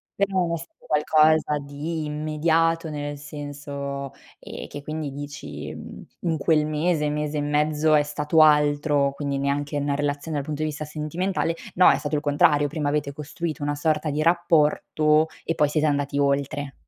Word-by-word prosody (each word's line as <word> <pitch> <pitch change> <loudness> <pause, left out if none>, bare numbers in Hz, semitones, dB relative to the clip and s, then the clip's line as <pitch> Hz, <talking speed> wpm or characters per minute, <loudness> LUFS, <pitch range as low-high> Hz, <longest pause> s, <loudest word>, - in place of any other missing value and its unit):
Però 195 -1 +1
non 170 -2 0
è - - 0
stato 165 +1 -13
qualcosa 155 0 +3
di 150 +3 -4
immediato, 160 +2 +1
nel 145 -1 -4
senso, 140 -1 -6 0.3
ehm, - - -8
che 145 - -8
quindi 155 -1 -4
dici 145 +1 -7
in 165 -2 -5
quel 150 0 +2
mese, 155 0 0
mese 150 0 -2
e - - 0
mezzo 150 +1 +1
è 150 - +6
stato 150 +2 +2
altro, 145 -2 +4
quindi 140 -1 -3
neanche 145 +1 -1
una 145 0 0
relazione 145 +1 -2
dal 140 - -3
punto 155 0 -4
di 155 - 0
vista 155 0 -5
sentimentale, 165 +3 -2 0.2
no, 180 - +7
è - - +2
stato 150 0 -3
il 145 - 0
contrario. 145 0 +3
Prima 150 -1 -2
avete 145 -1 -1
costruito, 150 +1 -5
una 145 0 -1
sorta 155 +1 0
di 150 +2 -1
rapporto 155 -2 +3 0.2
e 165 - -1
poi 150 -2 +3
siete 155 +1 +1
andati 145 -1 0
oltre. 140 0 0
150 Hz, 170 wpm, -24 LUFS, 145-155 Hz, 0.3 s, no